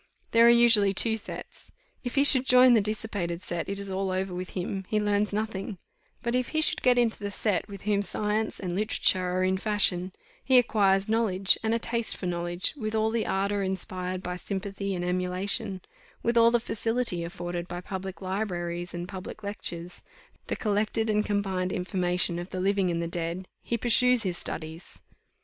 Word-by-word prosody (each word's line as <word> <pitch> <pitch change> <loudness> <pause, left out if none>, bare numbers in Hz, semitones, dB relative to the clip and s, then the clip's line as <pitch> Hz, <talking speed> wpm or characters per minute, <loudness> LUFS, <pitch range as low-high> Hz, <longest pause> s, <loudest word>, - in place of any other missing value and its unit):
There 230 +1 +6
are - - +8
usually 230 -5 +6
two 225 +3 +3
sets: 220 - -9 0.3
if 245 - -4
he 280 - +4
should 265 -3 +7
join 250 0 +7
the 225 - +5
dissipated 200 -5 -2
set, 175 -1 -4
it 200 - -3
is 200 -1 -5
all 190 0 -1
over 185 0 -2
with 180 0 -5
him, 190 +2 -3
he 215 - 0
learns 205 0 +1
nothing; 210 -1 -3 0.5
but 235 0 -1
if 250 0 +1
he 315 - -1
should - - +1
get 250 -1 +4
into 235 -2 +1
the 205 -1 -4
set 200 0 -1
with 200 -2 -10
whom 205 -1 +1
science 210 +2 -2
and 180 -3 -4
literature 195 -1 +2
are 185 +1 0
in 185 0 +1
fashion, 190 -3 +1 0.3
he 260 -1 +5
acquires 200 -5 +3
knowledge, 205 -4 +3
and 225 0 +1
a - - +2
taste 230 0 -1
for - - -6
knowledge; 175 0 -1
with 220 -5 -4
all 220 0 +1
the 230 -1 -1
ardour 200 +1 0
inspired 185 -1 -3
by 180 0 -4
sympathy 195 +1 -4
and 175 0 -3
emulation, 185 +3 -1 0.4
with 235 +1 +1
all 230 0 +6
the 240 0 +2
facility 225 -5 -1
afforded 175 0 -5
by 175 0 -5
public 190 +1 -6
libraries 175 -3 -3
and 175 +1 -5
public 190 +3 -8
lectures 180 -4 -3 0.5
the - - -1
collected 215 +1 0
and 210 0 +1
combined 190 -3 -1
information 180 -2 0
of 175 +2 -7
the 185 - -5
living 195 0 +1
and 170 -1 -1
the - - -2
dead 170 +2 -3
he 235 - -2
pursues 250 +1 +3
his 185 -3 -2
studies. 160 0 -6
195 Hz, 190 wpm, -27 LUFS, 180-220 Hz, 0.5 s, are